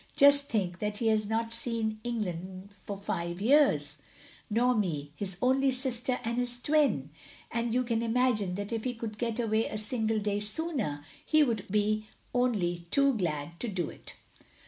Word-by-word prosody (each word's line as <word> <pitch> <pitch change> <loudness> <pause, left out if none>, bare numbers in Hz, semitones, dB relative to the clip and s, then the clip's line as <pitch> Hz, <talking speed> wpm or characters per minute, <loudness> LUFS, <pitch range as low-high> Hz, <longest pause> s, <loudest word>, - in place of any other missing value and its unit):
Just 280 0 +6
think 185 -5 -1
that 210 0 -2
he 225 0 +1
has 215 -1 +2
not 225 +1 -1
seen 230 -2 -1
England 190 -5 -4
for 200 +1 -7
five 170 -3 -3
years 195 - +3 0.2
— - - -21
nor 240 +4 +3
me 160 -10 -1
— - - -33
his 190 +1 -4
only 265 +2 +4
sister 255 -1 0
and 235 +1 -1
his 245 0 -1
twin! 245 - +2 0.4
And 230 0 -1
you 250 +2 +2
can 230 -2 0
imagine 230 -5 +1
that 205 +3 -4
if 225 -1 -2
he 250 -1 -2
could 220 -2 -6
get 235 -1 -1
away 220 -1 +1
a - - -4
single 220 0 0
day 205 -1 0
sooner, 210 - -2 0.2
he 310 -1 +4
would 225 -7 -1
be 210 +1 +1 0.3
only 180 -9 0
too 275 +4 +4
glad 170 -4 -2
to 245 - -3
do 185 -7 -2
it." - - -12
220 Hz, 180 wpm, -30 LUFS, 195-245 Hz, 0.4 s, Just